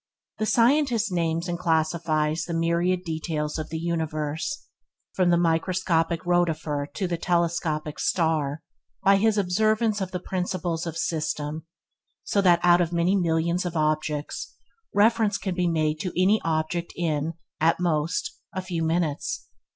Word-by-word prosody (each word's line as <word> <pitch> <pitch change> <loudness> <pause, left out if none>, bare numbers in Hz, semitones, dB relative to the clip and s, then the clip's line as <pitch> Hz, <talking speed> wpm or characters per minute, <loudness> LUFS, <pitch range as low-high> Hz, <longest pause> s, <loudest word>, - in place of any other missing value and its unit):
The 215 - 0
scientist 240 -3 +3
names 165 -1 0
and 175 -1 -3
classifies 160 -1 +1
the 170 - -3
myriad 170 +2 +1
details 160 -2 -3
of 155 - -5
the 160 - -3
universe, 160 - -2 0.5
from 185 -2 +2
the 170 - +4
microscopic 170 0 +1
rotifer 160 -5 0
to 190 - -1
the 170 -1 -2
telescopic 165 -3 0
star, 155 -4 0 0.4
by 195 0 +6
his 215 +1 +2
observance 215 +3 +1
of 190 - -2
the 180 - -4
principle 180 -2 -2
of 165 0 -4
system, 155 -1 -2 0.6
so 200 - +1
that 175 -3 +4
out 175 0 +6
of 170 -1 0
many 175 +3 +2
millions 170 -1 +1
of 175 -2 -3
objects, 155 -1 -1 0.4
reference 215 0 +3
can 190 -2 -3
be 180 0 0
made 155 -2 0
to 180 +1 -3
any 200 +4 +4
one 165 - 0
object 160 +2 -2
in, 160 -2 -1 0.3
at 165 +2 +3
most, 175 - -1 0.2
a 185 - -2
few 175 -3 -3
minutes. 160 -2 -1
170 Hz, 150 wpm, -25 LUFS, 160-185 Hz, 0.6 s, by